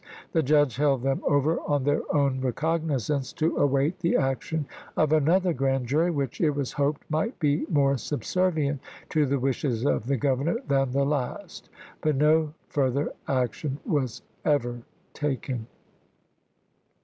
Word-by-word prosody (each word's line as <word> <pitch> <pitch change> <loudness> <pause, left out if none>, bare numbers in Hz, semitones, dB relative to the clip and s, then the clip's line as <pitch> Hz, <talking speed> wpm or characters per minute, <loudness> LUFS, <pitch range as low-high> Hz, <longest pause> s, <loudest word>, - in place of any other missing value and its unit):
The 165 - +2
judge 145 -4 +3
held 140 -3 +2
them 135 0 0
over 145 +3 +2
on 145 -2 0
their 145 +2 +2
own 140 -3 +1
recognizance 145 0 -1
to 160 +2 0
await 145 +5 +2
the 170 -1 +1
action 135 +3 -1 0.3
of 155 0 +3
another 170 +4 +3
grand 135 -2 0
jury, 155 +8 +2
which, 140 -6 -2
it 160 - +4
was 140 -3 -2
hoped, 145 0 -1
might 160 - -1
be 150 -1 +1
more 140 -4 +2
subservient 150 -2 0 0.3
to 150 -2 +2
the 140 +1 +1
wishes 130 -2 -1
of 120 - +1
the 140 0 +1
Governor 140 - +1
than 135 -1 +2
the 140 +2 +1
last; 140 -3 -3 0.3
but 155 -2 +1
no 155 +2 +3 0.2
further 140 0 0
action 130 +2 -1
was 135 - -1 0.2
ever 120 -5 0 0.3
taken. 130 -5 -3
145 Hz, 145 wpm, -26 LUFS, 135-155 Hz, 0.3 s, it